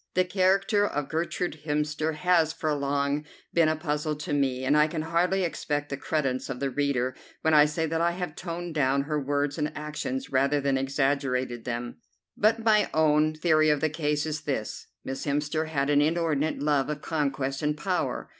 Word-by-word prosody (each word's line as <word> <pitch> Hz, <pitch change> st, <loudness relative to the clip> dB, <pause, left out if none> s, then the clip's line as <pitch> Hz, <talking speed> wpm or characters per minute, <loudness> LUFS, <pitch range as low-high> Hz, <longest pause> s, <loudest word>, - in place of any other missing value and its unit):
The 185 Hz, 0 st, +3 dB
character 195 Hz, +3 st, +2 dB
of 145 Hz, -5 st, -3 dB
Gertrude 165 Hz, 0 st, -2 dB
Hemster 150 Hz, +1 st, -1 dB
has 165 Hz, -1 st, +2 dB
for 155 Hz, -1 st, -1 dB
long 140 Hz, +1 st, 0 dB, 0.3 s
been 165 Hz, -2 st, +4 dB
a 155 Hz, -, +1 dB
puzzle 150 Hz, -1 st, -2 dB
to 150 Hz, +1 st, -5 dB
me, 130 Hz, -2 st, 0 dB
and 145 Hz, +3 st, +3 dB
I 150 Hz, 0 st, +5 dB
can 155 Hz, 0 st, -3 dB
hardly 175 Hz, +4 st, +1 dB
expect 145 Hz, -3 st, -2 dB
the 140 Hz, -, -2 dB
credence 135 Hz, -2 st, -2 dB
of 130 Hz, -2 st, -4 dB
the 140 Hz, -1 st, -1 dB
reader 130 Hz, -2 st, 0 dB, 0.3 s
when 160 Hz, -, +3 dB
I 150 Hz, -1 st, +7 dB
say 155 Hz, +2 st, -1 dB
that 160 Hz, +1 st, -1 dB
I 170 Hz, 0 st, +2 dB
have 175 Hz, -3 st, -5 dB
toned 175 Hz, -1 st, -5 dB
down 140 Hz, -2 st, +2 dB
her 150 Hz, +1 st, -1 dB
words 145 Hz, +1 st, -1 dB
and 150 Hz, 0 st, -1 dB
actions 260 Hz, -, -4 dB
rather 140 Hz, +2 st, +2 dB
than 140 Hz, -1 st, +1 dB
exaggerated 135 Hz, -3 st, 0 dB
them. 120 Hz, 0 st, -4 dB, 0.4 s
But 225 Hz, +2 st, +2 dB
my 215 Hz, -2 st, +4 dB
own 155 Hz, 0 st, +3 dB
theory 155 Hz, -1 st, +3 dB
of 150 Hz, -1 st, +3 dB
the 155 Hz, +1 st, 0 dB
case 150 Hz, -1 st, -1 dB
is 155 Hz, 0 st, -3 dB
this: 135 Hz, -8 st, -4 dB, 0.2 s
Miss 135 Hz, +2 st, -5 dB
Hemster 150 Hz, +2 st, 0 dB
had 145 Hz, -2 st, 0 dB
an 145 Hz, 0 st, +4 dB
inordinate 155 Hz, -2 st, 0 dB
love 145 Hz, -2 st, +2 dB
of 150 Hz, 0 st, -4 dB
conquest 140 Hz, -3 st, -1 dB
and 150 Hz, 0 st, 0 dB
power. 180 Hz, +4 st, -2 dB
150 Hz, 190 wpm, -27 LUFS, 140-160 Hz, 0.4 s, I